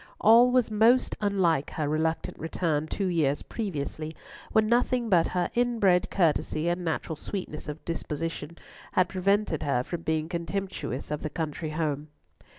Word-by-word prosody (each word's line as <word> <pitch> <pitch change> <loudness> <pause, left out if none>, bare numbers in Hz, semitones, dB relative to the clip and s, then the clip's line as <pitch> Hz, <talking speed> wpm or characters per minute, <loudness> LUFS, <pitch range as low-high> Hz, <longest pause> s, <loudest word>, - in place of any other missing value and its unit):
All 230 +3 +7
was 250 -3 +2
most 225 +4 +4
unlike 185 -8 +2
her 155 -2 -1
reluctant 160 +2 -1
return 160 -2 -1
two 195 - -2
years 155 -6 +1
previously, 155 -6 -4 0.4
when 220 0 +4
nothing 240 +1 +2
but 175 -4 +4
her 180 -1 -1
inbred 230 -7 +2
courtesy 165 -2 +1
and 175 +1 -1
natural 160 -1 -2
sweetness 155 -3 -6
of 150 +1 -7
disposition 165 0 -4 0.4
had 185 0 +3
prevented 195 -2 +1
her 125 -4 +1
from 170 +5 -5
being 160 -1 -1
contemptuous 170 -5 -4
of 150 - -2
the 155 - -3
country 155 0 -4
home. 155 -2 -2
170 Hz, 150 wpm, -27 LUFS, 155-200 Hz, 0.4 s, All